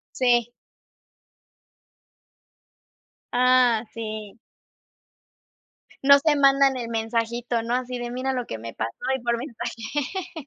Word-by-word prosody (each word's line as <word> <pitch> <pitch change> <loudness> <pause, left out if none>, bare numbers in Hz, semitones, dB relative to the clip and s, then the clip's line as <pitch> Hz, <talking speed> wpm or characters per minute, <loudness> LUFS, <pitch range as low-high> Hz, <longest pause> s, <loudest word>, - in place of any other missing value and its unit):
Sí. 240 -2 +2 2.8
Ah, 250 -2 +4
sí. 215 -2 -6 1.7
No 280 +1 +8
se 295 +1 +2
mandan 275 -1 +4
el 235 -2 -5
mensajito, 230 +1 -1
¿no?, 235 +2 -2
así 250 0 -2
de 240 0 -5
mira 255 +2 -2
lo 250 -2 -3
que - - -5
me 115 +1 -8
pasó 110 +1 -4 0.2
y 265 - -3
por 235 -1 +1
mensaje. 280 - -5
245 Hz, 110 wpm, -24 LUFS, 230-265 Hz, 2.8 s, No